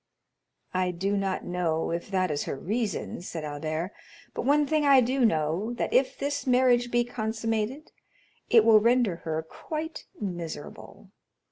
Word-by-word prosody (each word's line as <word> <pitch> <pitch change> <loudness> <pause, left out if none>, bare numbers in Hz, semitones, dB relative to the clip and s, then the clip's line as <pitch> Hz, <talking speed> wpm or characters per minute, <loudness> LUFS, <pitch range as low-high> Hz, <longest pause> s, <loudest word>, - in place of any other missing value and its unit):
"I 185 0 +1
do 190 +3 -1
not 195 -1 -1
know 170 -3 -1
if 170 +2 -3
that 185 -3 +1
is 145 - -2
her - - -3
reason," 210 - -3
said 170 -3 -6
Albert, 155 +4 -3 0.4
"but - - -4
one 295 +2 +4
thing 310 +1 +1
I 280 -2 +7
do 255 +2 +1
know, 170 +3 +1
that 240 - -2
if 260 +1 +2
this 285 0 -3
marriage 245 -1 +4
be 240 0 +2
consummated, 225 +3 -3 0.6
it 225 -2 +6
will 220 -2 +7
render 230 -5 +2
her 160 -1 -3
quite 315 - -6
miserable. 175 -7 -7
215 Hz, 150 wpm, -27 LUFS, 170-250 Hz, 0.6 s, I